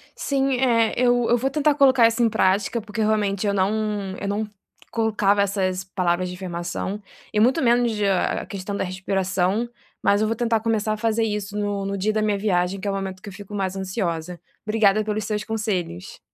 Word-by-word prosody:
Sim, 275 -1 0
eh, 230 -3 +3
eu 245 -1 +3
eu 240 - +4
vou 265 +3 0
tentar 300 0 +2
colocar 265 -5 +6
isso 230 +1 -1
em 230 - +4
prática, 200 +3 +1
porque 220 +1 -5
realmente 210 -2 +1
eu 200 - +1
não 195 0 +2 0.5
eu 200 - -4
não 210 +2 -1 0.4
colocava 210 -3 +2
essas 190 -2 0
palavras 185 -1 -1
de 180 - -6
afirmação, 180 +2 -4 0.3
e 210 - +2
muito 255 +9 +4
menos 240 -1 +3
de 210 -2 -1
a 195 -2 +1
a - - -10
questão 200 0 -5
da - - -1
respiração, 190 +3 -1 0.3
mas 200 +1 +3
eu 215 - +2
vou 225 - 0
tentar 230 -1 +1
começar 220 -1 0
a - - -4
fazer 225 0 +1
isso 210 -1 -3
no 205 -1 -2
no 200 0 -2
dia 210 +3 0
da 215 - +1
minha 210 -1 +1
viagem, 190 -2 0
que 200 - -5
é - - +1
o - - -3
momento 190 -1 -5
que 205 - -8
eu - - -11
fico 205 +2 -10
mais 190 -1 -2
ansiosa. 180 -3 -3 0.3
Obrigada 215 -1 +3
pelos 215 0 -2
seus 210 0 -2
conselhos. 200 - -3
205 Hz, 210 wpm, -23 LUFS, 190-225 Hz, 0.5 s, colocar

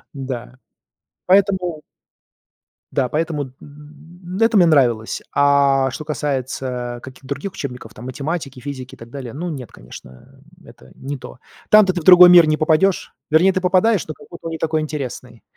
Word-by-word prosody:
Да. 130 -2 -6 0.7
Поэтому 185 -4 +2 1.1
Да, 130 -2 0
поэтому, 155 0 -2
м 130 - -12
м-м, 150 +3 -15 0.2
ну, 225 - +4
это 225 -1 +2
мне 180 - +6
нравилось, 125 -9 +2
а 140 -1 +3
что 140 - -6
касается 130 -4 -4
каких-то 130 0 -12
других 140 +8 -5
учебников 125 -9 -7
там: 120 - -11
математики, 140 0 -5
физики 130 -1 -8
и - - -25
так 115 - -12
далее, 125 -3 -8
ну 170 +5 -5
нет, 130 -7 -7
конечно, 60 +1 -14 0.2
это - - -17
не 140 +1 -6
то. 125 - -12 0.3
Там-то 210 -3 +6
ты 175 - -3
в - - -12
другой 180 +1 +9
мир 175 -2 +8
не 155 0 +1
попадешь, 160 +5 +1 0.2
вернее, 175 +5 +4
ты 185 - -1
попадаешь, 185 +2 +2
но 155 - -5
какой-то 170 - -14
он - - -5
не 160 - -4
такой 160 0 -1
интересный. 130 -5 -6
145 Hz, 170 wpm, -19 LUFS, 130-170 Hz, 1.1 s, другой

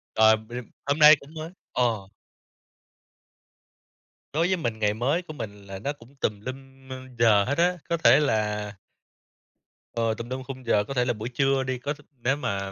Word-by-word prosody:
Ờ, 110 0 +6
b 110 +1 -12 0.3
hôm 145 +2 0
nay 150 0 +10
cũng 140 +3 -15
mới 160 +1 -6 0.2
ờ. 115 -6 0 2.2
Đối 165 +3 +2
với 185 0 +1
mình 115 -9 -3
ngày 105 -1 +2
mới 135 +10 0
của 170 -3 -10
mình 105 -7 -7
là 95 -1 -7
nó 140 +8 -2
cũng 130 0 -19
tùm 105 -6 -2
lum 135 +2 -9 0.3
giờ 110 -3 +5
hết 140 - -1
á. 180 +1 +3
Có 170 - +1
thể 160 - +6
là 105 -6 0 1.2
Ờ, 115 -1 +1
tùm 115 +2 -7
lum 130 +1 -4
khung 130 -1 -8
giờ. 105 -3 +3
Có 125 - -6
thể 125 -2 +1
là 120 - +1
buổi 110 +2 -5
trưa 135 +1 +1
đi, 130 -1 -2
có 145 +4 -2
th 150 - -16 0.2
nếu 130 +3 +2
mà 100 -8 -3
125 Hz, 190 wpm, -26 LUFS, 110-145 Hz, 2.2 s, nay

